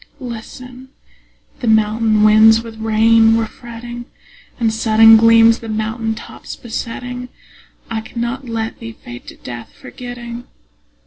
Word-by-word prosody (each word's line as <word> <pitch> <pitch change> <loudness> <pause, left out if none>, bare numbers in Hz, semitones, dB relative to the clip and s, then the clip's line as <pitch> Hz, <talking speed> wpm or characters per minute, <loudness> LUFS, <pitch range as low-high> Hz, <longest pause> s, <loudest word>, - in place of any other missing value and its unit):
Listen: 250 +1 -9 0.7
the 245 - -4
mountain 220 0 +2
winds 220 +1 +6
with 230 -1 -10
rain 225 +1 +4
were 225 - 0
fretting, 240 0 -10 0.5
And 225 -2 +1
sudden 225 0 +6
gleams 230 0 +5
the 225 - -9
mountain 220 +1 -2
tops - - -10
besetting. 245 +2 -6 0.6
I 225 -1 -3
cannot 235 +3 -5
let 225 -1 -4
thee 230 -1 -8
fade 120 - -12
to - - -10
death, 120 -1 -9
forgetting. 245 -1 -9
225 Hz, 125 wpm, -17 LUFS, 220-240 Hz, 0.7 s, winds